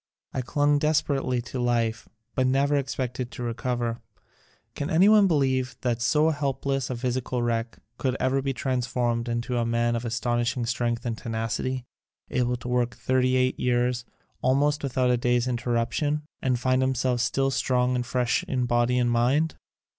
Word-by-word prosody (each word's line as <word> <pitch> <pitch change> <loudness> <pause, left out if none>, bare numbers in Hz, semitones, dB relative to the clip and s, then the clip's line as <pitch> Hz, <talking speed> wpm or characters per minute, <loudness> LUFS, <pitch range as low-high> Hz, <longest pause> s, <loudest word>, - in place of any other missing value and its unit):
I 130 - -1
clung 145 +3 +2
desperately 140 -5 +1
to 125 +1 -6
life, 115 -2 0 0.2
but 130 -1 +1
never 140 +2 +2
ex 135 -1 -1
pected 125 -1 -3
to 125 - -7
recover. 120 0 -2 0.7
Can 145 - -4
anyone 200 +5 +6
believe 130 -5 +1
that 120 -2 -1
so 150 +6 +3
hopeless 135 -2 -1
a 130 - -2
physical 125 0 -2
wreck 115 0 -1 0.2
could 130 -1 0
ever 130 +1 +1
be 135 0 -1
transformed 120 -2 -1
into 120 +1 -1
a - - +1
man 115 0 +1
of 115 - -3
astonishing 120 +1 -1
strength 120 0 -1
and 115 -2 -1
tenacity, 115 +3 -3 0.5
able 125 -1 +1
to 120 0 -8
work 125 -1 0
thirty 130 0 +1
eight 130 0 +1
years 125 0 +1 0.4
almost 145 +3 +2
without 130 -2 +1
a 125 - +3
day's 120 0 +1
interrup 120 -1 0
tion, 150 0 -1 0.2
and 125 -2 +1
find 130 +1 +2
himself 130 -1 +1
still 135 +2 +1
strong 125 -1 +1
and 120 -1 -2
fresh 125 -1 +1
in 125 -2 -1
body 120 +1 +2
and 120 -1 +2
mind? 130 +7 +2
125 Hz, 165 wpm, -26 LUFS, 120-130 Hz, 0.7 s, anyone